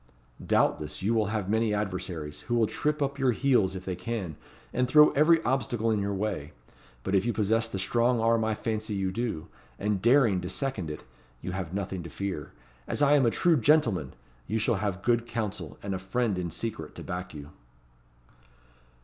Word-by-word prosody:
Doubtless, 75 +4 +1
you 110 +4 +2
will 110 -3 +2
have 105 -3 -2
many 110 0 +1
adversaries, 90 -7 -4
who 120 - +2
will 115 -2 +4
trip 150 +6 -1
up 140 0 -3
your 130 -2 +3
heels 110 -8 +2
if 95 0 -7
they 95 - -2
can, 90 -3 -4 0.4
and 125 0 +1
throw 150 +3 +7
every 160 +3 +4
obstacle 120 -3 0
in 105 -2 +1
your 100 0 -1
way; 95 -7 -3 0.5
but 95 - -2
if 95 -1 +4
you 120 - +1
possess 115 +1 +1
the 100 - -4
strong 120 +5 +2
arm 115 0 +3
I 110 0 0
fancy 110 -1 -3
you 95 -1 -1
do, 110 -7 -3 0.3
and 105 -2 -1
daring 120 -6 +4
to 90 - -5
second 110 - -3
it, 75 - -7 0.4
you 90 - -3
have 90 -3 -4
nothing 95 -2 -3
to 85 - -8
fear. 95 -3 -4 0.4
As 145 - 0
I 145 0 +5
am 135 -4 +5
a - - +6
true 165 +7 +3
gentleman! 115 - +2 0.3
you 110 - 0
shall 110 0 +1
have 95 -1 -2
good 120 -1 +2
counsel, 105 -8 -4
and 100 -1 -2
a 95 - -2
friend 110 +3 0
in 85 -1 -2
secret 80 -3 -5
to - - -8
back 90 -2 -5
you." 75 0 -9
105 Hz, 195 wpm, -28 LUFS, 95-120 Hz, 0.5 s, throw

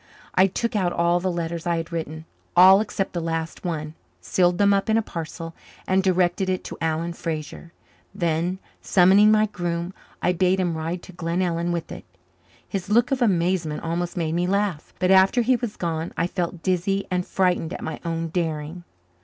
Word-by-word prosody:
I 190 +1 +5
took 225 +4 -2
out 185 -4 +1
all 170 0 +2
the 185 +1 -1
letters 170 0 -4
I 170 -1 +1
had 165 +1 -5
written 160 -1 -5 0.3
all 190 +3 +8
except 200 -2 -3
the 170 - -2
last 165 0 -3
one 155 -4 -3 0.3
sealed 175 - +1
them 200 +1 +4
up 195 +2 0
in 220 - +4
a 225 - +1
parcel 165 -2 -6 0.3
and 190 +1 +3
directed 185 0 +1
it 185 -1 -1
to - - -7
Alan 165 +1 -1
Fraser. 160 0 -6 0.4
Then, 170 0 0 0.2
summoning 195 +3 +5
my 215 0 +4
groom, 175 -3 -3 0.3
I 180 - +1
bade 185 +1 +2
him 175 -3 0
ride 165 +3 -4
to - - -11
Glenellyn 170 0 -1
with 170 -1 -3
it. - - -8 0.6
His 195 -2 -4
look 235 +4 +3
of 265 -1 0
amazement 175 -6 +1
almost 170 +2 -3
made 160 -2 -1
me 175 +1 0
laugh, 200 -4 -1
but 185 0 +2
after 190 +6 +5
he 255 +2 +3
was 240 -3 -4
gone 165 -1 -3
I - - +1
felt 175 -1 -3
dizzy 190 +2 0
and 180 0 +1
frightened 180 -3 0
at - - -6
my 160 - -5
own 165 -1 -2
daring. 160 0 -3
175 Hz, 185 wpm, -24 LUFS, 165-190 Hz, 0.6 s, all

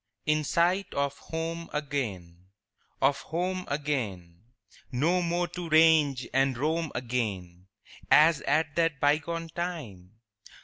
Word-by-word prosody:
In 155 0 +2
sight 175 +6 +1
of 140 0 0
home 165 +1 -5
again, 100 - -4 0.6
Of 140 0 +3
home 180 +3 -3
again; 110 - -3 0.5
No 165 +9 +1
more 175 +1 0
to 175 -1 -6
range 155 -4 +4
and 135 -1 +2
roam 160 +3 -1
again 100 -8 -3 0.4
As 155 0 +6
at 145 +1 +1
that 165 -4 +1
bygone 160 +3 0
time? 120 - -6
150 Hz, 115 wpm, -28 LUFS, 125-165 Hz, 0.6 s, As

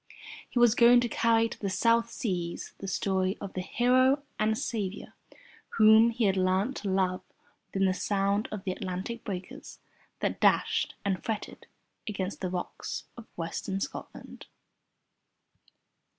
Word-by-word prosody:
He - - -6
was 240 -2 +6
going 240 0 +7
to 240 - 0
carry 230 0 +2
to 230 - -9
the 200 - -2
South 230 +4 +2
Seas 175 -8 -4
the 195 - -6
story 190 0 0
of 200 - -7
the 185 - -3
Hero 255 +7 +3 0.2
and 215 +1 +2
Saviour 205 -5 -4 0.6
Whom 220 +1 +7
he 230 0 -2
had 195 -2 +3
learnt 190 +7 +1
to 200 - -4
love 185 -1 +1 0.5
within 195 0 0
the 185 - +2
sound 200 +2 0
of 210 -3 -5
the 190 - -2
Atlantic 185 +5 -5
breakers 185 -2 -7 0.4
that - - -2
dashed - - +2
and 190 -2 -1
fretted 220 -2 -5 0.4
against 195 -2 -4
the 185 - -1
rocks 180 0 -5
of 235 -2 -11
Western 175 +3 -3
Scotland. - - -7
200 Hz, 145 wpm, -29 LUFS, 190-230 Hz, 0.6 s, going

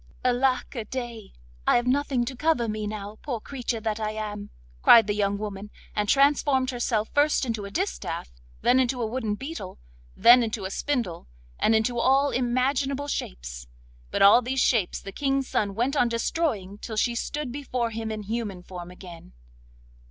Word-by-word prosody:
'Alack 255 +1 +1
a 235 -5 -4
day! 235 -3 -6 0.4
I - - +5
have 240 - +2
nothing 260 -1 +1
to 260 - -5
cover 305 -4 +1
me 215 -1 -3
now, 210 0 -6
poor 250 -6 -3
creature 245 -1 -4
that 215 0 -2
I 215 0 -2
am!' 210 -1 -5 0.3
cried 230 -2 +8
the 205 - 0
young 200 -1 0
woman, 205 -1 -6 0.3
and 210 -1 0
transformed 275 -2 +3
herself 235 -3 -1
first 290 -1 +3
into 225 -4 -3
a - - -6
distaff, - - -3 0.3
then 255 - +5
into 255 0 +1
a 235 - 0
wooden 220 -2 -2
beetle, 270 - -7 0.4
then 240 +3 +8
into 220 -3 -2
a 190 - -4
spindle, 235 - -2 0.3
and 225 - +3
into 235 +2 +1
all 270 +3 +3
imaginable 265 +3 0
shapes. - - -5 0.4
But - - +1
all 205 +5 +8
these 260 +2 -2
shapes 225 -8 +2
the 195 - -8
King's 275 +2 0
son 200 -2 -1
went 250 +6 0
on 245 -4 +3
destroying 230 - -1
till 220 -1 -6
she 240 +3 +2
stood 285 +3 -3
before 250 -4 -2
him 225 0 -4
in 215 -1 -4
human 205 -4 -4
form 175 -1 -8
again. 175 - -12
230 Hz, 175 wpm, -26 LUFS, 210-260 Hz, 0.4 s, cried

